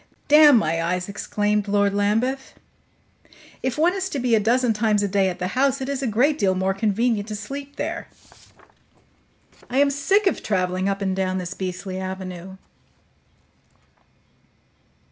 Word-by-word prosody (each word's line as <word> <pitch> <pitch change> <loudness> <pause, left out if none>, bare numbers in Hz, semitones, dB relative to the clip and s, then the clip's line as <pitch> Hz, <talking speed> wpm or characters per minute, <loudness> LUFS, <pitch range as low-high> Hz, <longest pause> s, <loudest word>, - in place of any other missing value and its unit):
"Damn 295 -2 +7
my 165 -5 0
eyes!" 180 +2 -2
exclaimed 210 0 -1
Lord 200 0 +2
Lambeth. 225 +7 -1 1.1
"If 260 +1 -2
one 335 +4 +3
is 380 -1 -3
to 290 - -4
be 250 -2 0
a 220 - +5
dozen 235 +2 +2
times 210 -1 +1
a - - +1
day 195 -1 +1
at 180 - -5
the 180 - -3
house, 275 +4 +1
it 265 - -4
is 280 -1 -3
a 265 - -1
great 265 +8 +2
deal 190 -2 +2
more 190 +1 0
convenient 215 +1 0
to 215 - -5
sleep 275 +7 -7
there. 330 +3 -4 1.6
I 250 - -2
am 280 0 +4
sick 385 +9 +1
of 380 - +1
traveling 185 -1 -1
up 195 0 -2
and 190 -1 -1
down 185 -1 -1
this 180 0 -4
beastly 185 0 -5
avenue." 190 -1 -7
210 Hz, 160 wpm, -23 LUFS, 190-265 Hz, 1.6 s, Damn